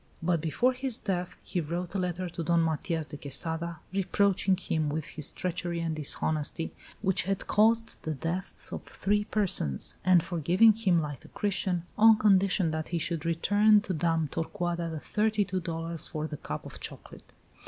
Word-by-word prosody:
But 170 -2 +1
before 205 - +2
his 255 -2 0
death 180 -3 -3
he 180 - -2
wrote 170 +3 -4
a 200 - -1
letter 180 0 -2
to 170 0 -5
Don 170 +2 +2
Matias 160 0 -1
de 145 - -9
Quesada, 160 +4 -4 0.2
reproaching 195 0 +2
him 160 -4 -1
with 155 0 -2
his 155 - -2
treachery 175 -1 -3
and 165 -1 -2
dishonesty 155 +2 -1 0.3
(which 190 -3 +1
had 195 0 -2
caused 225 +2 +2
the 155 -1 -3
deaths 175 +6 -3
of - - -4
three 205 +1 -1
persons), 195 - +1
and 180 -2 +5
forgiving 180 +6 +4
him 190 -7 +2
like 145 -3 -6
a - - -13
Christian, 185 -3 -1
on 220 0 +8
condition 195 -4 +3
that 155 0 -3
he 175 - -2
should 165 0 -2
return 205 +6 +4
to 195 - -3
Dame 165 -1 +1
Torcuata 170 +2 -2
the 160 -1 -4
thirty 210 +3 +1
two 190 -1 -2
dollars 165 -1 -2
for 155 0 -4
the 155 -1 -5
cup - - -6
of - - -9
chocolate. - - -6
175 Hz, 175 wpm, -29 LUFS, 160-195 Hz, 0.3 s, on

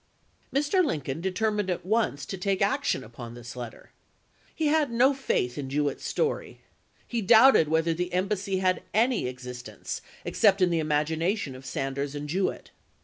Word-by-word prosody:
m's. 285 +2 +1
Mr. 370 +3 +3
Lincoln 150 - -2
determined 205 +2 0
at 180 -1 -2
once 200 -9 0
to 195 - -5
take 195 0 -1
action 275 +8 +1
upon 120 +1 -9
this 120 0 -9
letter. 120 -2 -8 0.6
He 320 - -1
had 300 -3 +2
no 250 +4 +4
faith 145 - -1
in 135 -2 -4
Jewett's 145 0 -1
story. 465 - -2 0.5
He 235 -2 -2
doubted 220 - +7
whether 160 +1 +2
the 180 +2 -3
embassy 190 +1 -1
had 185 -1 +1
any 230 - +2
exist 125 -1 -7
ence, - - -6 0.2
except 200 -2 +3
in 180 -2 +3
the 165 - +2
imagination 155 +3 0
of 130 +1 -10
Sanders 135 +2 -3
and 145 0 -5
Jewett. 185 +5 -2
180 Hz, 165 wpm, -27 LUFS, 140-220 Hz, 0.6 s, doubted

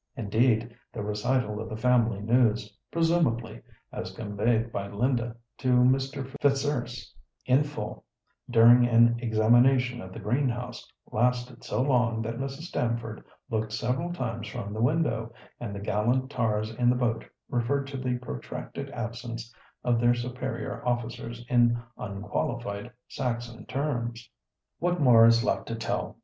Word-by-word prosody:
Indeed, 115 +1 +1 0.2
the 105 - -5
recital 105 +1 0
of 110 - -6
the 110 - -5
family 115 -3 +2
news 110 -2 +2 0.2
(presumably) 160 -10 +1 0.3
as 95 +1 -6
conveyed 115 +2 0
by 100 -2 -3
Linda 120 +3 0 0.2
to 130 -2 +2
Mr. 135 +2 +3 0.2
Fitzurse 145 +1 0 0.3
in 130 +2 +4
full, 145 -8 -6 0.5
during 120 +1 +7
an 120 0 +5
examination 120 +2 +3
of 95 - -9
the 105 - -8
green 125 +6 +1
house, 125 0 -6 0.2
lasted 125 +1 0
so 125 - 0
long 120 -4 +2
that 115 +1 -4
Mrs. 135 +2 -4
Stamford 115 -8 -2 0.3
looked 110 -1 -1
several 125 +10 -1
times 115 -9 -3
from 100 +1 -5
the 110 - -3
window, 120 -4 +1 0.3
and 105 -4 -5
the - - -4
gallant 120 +6 0
tars 110 -3 0
in 120 +2 +2
the 125 - +4
boat 115 -2 0 0.2
referred 135 +4 0
to 140 0 -6
the 130 -1 -1
protracted 125 - -6
absence 115 0 -6 0.3
of 120 -1 +2
their 120 +1 +4
superior 125 +1 -4
officers 120 -1 -3
in 120 -1 +4 0.2
unqualified 105 +2 -3 0.2
Saxon 120 -3 -4
terms. 120 -5 -2 0.5
What 175 +1 0
more 120 -5 +7
is 115 0 +5
left - - 0
to 115 - -3
tell? 115 - -3
120 Hz, 140 wpm, -28 LUFS, 110-125 Hz, 0.5 s, during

